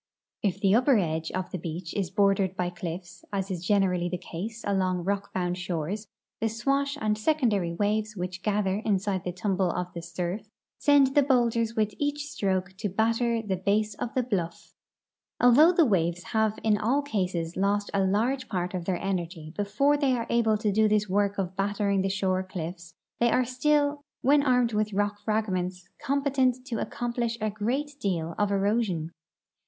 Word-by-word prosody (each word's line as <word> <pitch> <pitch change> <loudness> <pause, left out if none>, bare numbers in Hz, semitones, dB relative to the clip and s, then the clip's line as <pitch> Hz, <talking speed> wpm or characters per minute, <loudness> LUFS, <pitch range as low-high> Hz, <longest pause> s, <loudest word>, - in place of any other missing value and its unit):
If 200 -2 0
the 195 -1 +3
upper 250 +2 +5
edge 160 -4 -1
of 185 0 -3
the 185 - -3
beach 165 +1 -5
is 195 -4 -1
bordered 195 -1 +2
by 180 -1 -1
cliffs, 175 -2 -7
as 195 -1 -2
is 180 -2 -4
generally 180 -3 +2
the 180 - -2
case 205 +6 -6
along 185 -3 0
rock 200 +2 -2
bound 180 -1 -2
shores, 180 +4 -3 0.3
the 225 - +1
SAvash 275 +5 0
and 215 -1 +1
secondary 215 - +1
Avaves 215 +1 0
Avhich 180 0 -4
gather 200 -2 0
inside 195 -3 0
the 180 - -2
tumble 185 0 0
of 180 +1 -3
the 170 - -5
surf 180 +5 -4 0.3
send 280 -2 +5
the 290 - +6
boulders 235 -4 +2
Avith 215 -2 0
each 290 0 -1
stroke 190 -8 -1
to 210 0 -2
batter 230 +3 +1
the 195 -3 -1
base 205 +3 +1
of 230 +3 -5
the 255 - +2
bluff 185 -8 -3 0.7
Although 270 +8 +7
the 340 -3 +4
Avaves 175 -5 +1
have 220 -1 +2
in 210 -2 +3
all 260 +7 +1
cases 180 - -2
lost 205 +1 0
a 195 - +2
large 235 +7 +1
]>art 180 -2 -2
of 180 -2 -3
their 185 -1 0
energy 170 -4 -4
before 210 +9 +2
they 280 -3 +2
are 235 -2 -1
able 225 -2 +3
to 210 0 0
do 215 +2 +4
this 210 0 +2
Avork 200 +1 +1
of 190 -1 -2
battering 200 0 +1
the 195 - 0
shore 190 -1 0
cliffs 170 -2 -7 0.2
they 235 - +4
are 255 +2 +3
still, 285 +3 +1 0.2
Avhen 285 +2 +6
armed 250 -3 +3
Avith 215 -2 -1
rock 205 0 0
fragments, 185 -5 -2 0.2
comj)ctcnt 265 -2 +1
to 235 -4 -3
accomi»lish 235 0 -2
a 215 -1 -1
great 265 +8 -2
deal 170 - -1
of 205 -1 +2
erosion. 200 -5 0
205 Hz, 180 wpm, -27 LUFS, 185-230 Hz, 0.7 s, Although